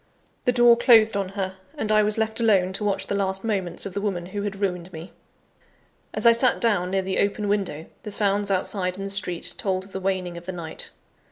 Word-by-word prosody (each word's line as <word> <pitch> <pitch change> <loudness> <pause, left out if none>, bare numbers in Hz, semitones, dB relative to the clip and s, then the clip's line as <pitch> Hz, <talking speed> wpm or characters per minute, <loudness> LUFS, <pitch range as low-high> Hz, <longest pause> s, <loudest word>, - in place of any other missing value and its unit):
The 250 - +4
door 240 -1 +6
closed 225 -3 +6
on 195 -2 -1
her; 190 -1 -3 0.2
and 215 - -1
I 215 0 +5
was 210 +1 +1
left 220 0 -1
alone 195 -5 +3
to 210 - -1
watch 200 -1 0
the - - -3
last 195 -1 -1
moments 195 -6 -2
of 195 - -6
the 200 - -3
woman 190 -4 -2
who 200 +3 -5
had 200 -1 -4
ruined 180 -3 -2
me! 165 +3 -9 1.0
As - - -2
I 235 - +9
sat 235 +2 +3
down 200 -6 +1
near 190 0 0
the 190 0 -1
open 205 +1 0
window, 195 -6 -1 0.2
the - - -7
sounds 205 0 +1
outside 185 -1 0
in 195 - -5
the 195 - -4
street 180 -3 -2
told 190 -2 -1
of 195 - -14
the 190 - -4
waning 185 -2 -2
of 170 - -18
the 185 - -3
night. 165 -2 -6
195 Hz, 230 wpm, -24 LUFS, 185-210 Hz, 1.0 s, I